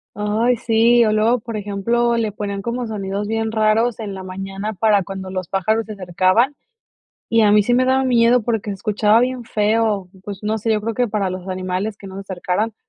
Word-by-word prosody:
Ay, 220 +4 +1
sí, 230 +1 +4
o 215 - +2
luego, 220 +3 +2
por 225 0 -6
ejemplo, 230 +4 0
le 220 -2 -1
ponían 200 -1 -4
como 235 +1 -3
sonidos 200 -1 -4
bien 225 0 -1
raros 220 +2 +1
en 205 -3 -5
la 190 - -7
mañana 195 +3 -5
para 205 0 +2
cuando 190 +1 -7
los 185 -2 -4
pájaros 215 +4 0
se 215 - -7
acercaban, 190 +7 +1 0.7
y 230 0 +3
a 210 -1 +5
mí 210 0 +5
sí 245 +4 +1
me 255 +1 +3
daba 265 +1 +2
miedo 240 -1 +3
porque 225 -2 -2
se 200 - -3
escuchaba 210 +2 +2
bien 250 0 -1
feo, 210 -3 0
pues, 200 -2 -7
no 215 +1 0
sé, 225 +2 0
yo 215 - +2
creo 225 +2 -2
que 245 +2 0
para 205 -3 -1
los 185 0 -7
animales 185 +3 -3
que - - -13
no 190 -1 -9
se 195 - -5
acercaran, 195 +3 -2
215 Hz, 215 wpm, -20 LUFS, 195-230 Hz, 0.7 s, a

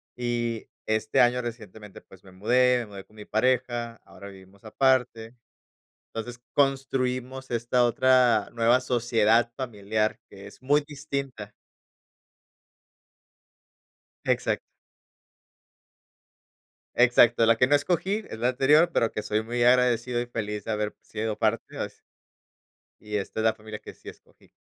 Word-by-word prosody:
y 120 -2 -3 0.2
este 110 0 +1
año 125 +1 +3
recientemente, 110 -3 -9
pues, 95 -1 -19
me 95 - -16
mudé, 125 +6 +2
me 120 - -4
mudé 100 -2 -10
con 110 - -24
mi 105 -1 -11
pareja, 120 0 0
ahora 100 +2 -12
vivimos 95 0 -17
aparte. 125 -1 0 0.8
Entonces, 120 +2 -6
construimos 130 -2 -1
esta 120 +1 +1
otra 120 -2 +3
nueva 120 +2 +3
sociedad 120 -2 +2
familiar, 110 -4 -2
que - - -13
es - - -17
muy 145 +3 +3
distinta. 140 -6 -6 2.7
Exacto. - - 0 2.4
Exacto, 120 -1 +5
la 115 0 +4
que 125 - +4
no 145 - +2
escogí 185 +8 0
es 110 - -7
la 120 +2 +1
anterior, 150 +7 +4
pero 115 - +1
que 105 - -4
soy 105 +1 -1
muy 120 +2 -1
agradecido, 125 -1 +3
y 120 - -3
feliz 105 -3 -4
de - - -5
haber 105 -1 -2
sido 110 0 -4
parte 110 0 -1
así - - -6 1.0
y 105 0 -5
esta 105 +2 -4
es - - -1
la 110 - +3
familia 110 -1 -9
que - - -11
sí - - -15
escogí. - - -16
120 Hz, 135 wpm, -26 LUFS, 110-125 Hz, 2.7 s, Exacto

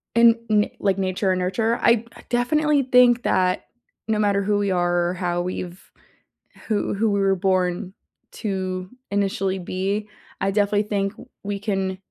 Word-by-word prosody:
And 235 0 +6
n 210 -1 +3
like 195 -2 +1
nature 190 0 0
and 185 - 0
nurture, 220 +6 0
I 235 -1 +3
I - - -14
definitely 290 +4 +2
think 245 -1 +5
that 185 -7 +1 0.4
no 220 -1 +1
matter 200 -1 +2
who 205 +1 +1
we 200 -1 0
are 175 -1 +1
or - - -2
how 175 -1 -1
we've 180 0 -6 0.8
who 215 -2 0
who 215 +2 +1
we 200 - +1
were 195 -1 +3
born 185 0 0 0.4
to 185 -3 -3 0.2
initially 195 -1 0
be, 190 +3 -2 0.3
I 195 0 0
definitely 205 0 +2
think 200 -1 -1
w - - -14 0.2
we 205 0 -3
can 195 -2 -2
200 Hz, 165 wpm, -23 LUFS, 185-215 Hz, 0.8 s, And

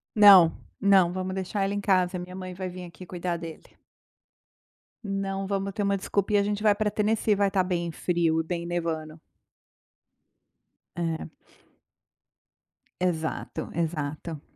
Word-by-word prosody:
Não, 195 -6 +9 0.3
não 195 -3 +5
vamos 185 0 -3
deixar 190 +1 -2
ela 195 +1 0
em 205 - -2
casa, 185 -2 +2
a - - -5
minha 180 +1 -8
mãe 185 -1 -6
vai 185 0 -5
vim 180 0 -8
aqui 175 +1 -11
cuidar 175 -1 -3
dele. 165 -1 -8 1.4
Não 195 -1 -3
vamos 195 0 -1
ter 210 - -3
uma 200 0 +2
desculpinha 200 +1 +1
a - - +1
gente 205 0 -2
vai 210 -1 +4
para 210 0 0
Tennessee, 215 +1 +1
vai 200 0 +2
estar 195 -1 +1
bem 175 -2 -2
frio 165 -1 +1
e - - -6
bem 170 0 -4
nevando. 165 -2 -3 1.8
É. 165 -2 -3 1.7
Exato, 160 -3 -2
exato. 155 -1 -3
185 Hz, 145 wpm, -27 LUFS, 170-200 Hz, 1.8 s, Não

